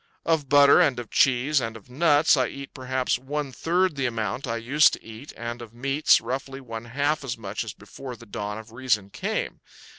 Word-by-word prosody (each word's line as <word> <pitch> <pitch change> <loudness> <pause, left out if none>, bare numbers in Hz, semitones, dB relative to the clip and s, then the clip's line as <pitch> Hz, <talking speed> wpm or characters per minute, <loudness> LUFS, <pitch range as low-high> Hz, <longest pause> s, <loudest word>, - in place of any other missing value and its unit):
Of 160 -5 +1
butter 140 0 +7
and 130 -4 +3
of 120 -2 -7
cheese 135 +3 +3
and 115 -1 -4
of 110 - -18
nuts 150 +4 +4
I 130 -3 +1
eat 140 +2 -9
perhaps 130 -1 -1
one 140 +1 -4
third 175 +4 0
the 135 -2 0
amount 115 +2 -3
I 115 - -1
used 140 +7 +4
to - - -7
eat, 115 +6 -10
and 120 +1 -5
of 115 -1 -11
meats, 135 +4 +3
roughly, 135 +1 -5
one 115 -3 -7
half 145 +5 -1
as 130 -3 -4
much 105 0 -4
as 115 - -7
before 125 +6 -9
the 115 - -14
dawn 105 0 -5
of 110 0 -11
reason 115 -5 -1
came. - - -3
130 Hz, 205 wpm, -25 LUFS, 115-140 Hz, -, butter